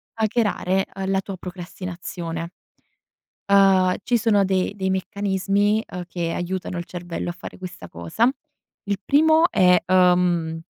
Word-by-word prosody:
hackerare, 210 Hz, -4 st, 0 dB
uhm, 195 Hz, 0 st, -3 dB
la 195 Hz, -, +2 dB
tua 195 Hz, 0 st, -7 dB
procrastinazione. 175 Hz, -2 st, -6 dB, 1.0 s
Ehm, 190 Hz, -2 st, +5 dB
ci 245 Hz, -, +1 dB
sono 205 Hz, -3 st, +3 dB
de 190 Hz, 0 st, 0 dB
dei 190 Hz, -2 st, -2 dB
meccanismi, 200 Hz, +2 st, 0 dB
ehm, 180 Hz, 0 st, -6 dB
che 170 Hz, -2 st, -3 dB
aiutano 180 Hz, 0 st, -3 dB
il 175 Hz, -, -4 dB
cervello 175 Hz, -1 st, -6 dB
a -, -, -3 dB
fare 180 Hz, -, -10 dB
questa 180 Hz, -, -9 dB
cosa. 85 Hz, -, 0 dB, 0.6 s
Il 200 Hz, -1 st, -2 dB
primo 315 Hz, +4 st, +4 dB
è, 180 Hz, -3 st, +5 dB
ehm, 180 Hz, -3 st, +2 dB
185 Hz, 135 wpm, -23 LUFS, 175-200 Hz, 1.0 s, Ehm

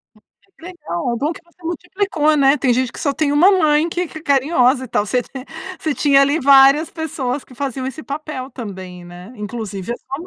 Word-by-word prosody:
Hum, 215 Hz, -, -23 dB, 0.2 s
que 385 Hz, -, -28 dB
legal, 335 Hz, -7 st, -4 dB
bom 295 Hz, +6 st, -1 dB
que -, -, -12 dB
você 345 Hz, +1 st, -28 dB
multiplicou, 340 Hz, -2 st, 0 dB
né. 275 Hz, 0 st, +4 dB
Tem 255 Hz, -2 st, +1 dB
gente 255 Hz, +1 st, 0 dB
que -, -, -9 dB
só 285 Hz, -, 0 dB
tem 285 Hz, 0 st, 0 dB
1 330 Hz, +7 st, +6 dB
mãe 310 Hz, 0 st, +3 dB
que 355 Hz, +1 st, -2 dB
que 315 Hz, -, -9 dB
é -, -, -14 dB
carinhosa 265 Hz, -3 st, +2 dB
e 255 Hz, -, -10 dB
tal, 205 Hz, -, 0 dB
você 250 Hz, +4 st, 0 dB
tem 260 Hz, +1 st, -10 dB, 0.3 s
você 310 Hz, -2 st, -2 dB
tinha 275 Hz, +2 st, +4 dB
ali 285 Hz, +3 st, +3 dB
várias 275 Hz, +3 st, +6 dB
pessoas 285 Hz, -5 st, -4 dB
que 255 Hz, -, -16 dB
faziam 265 Hz, 0 st, -4 dB
esse 270 Hz, +4 st, -6 dB
papel 285 Hz, -3 st, -6 dB
também, 185 Hz, -7 st, -8 dB
né, 175 Hz, +5 st, -12 dB
inclusive 210 Hz, -1 st, -5 dB
a -, -, -5 dB
sua 270 Hz, -, -7 dB
mãe. 340 Hz, -, -9 dB
275 Hz, 220 wpm, -19 LUFS, 250-315 Hz, 0.3 s, 1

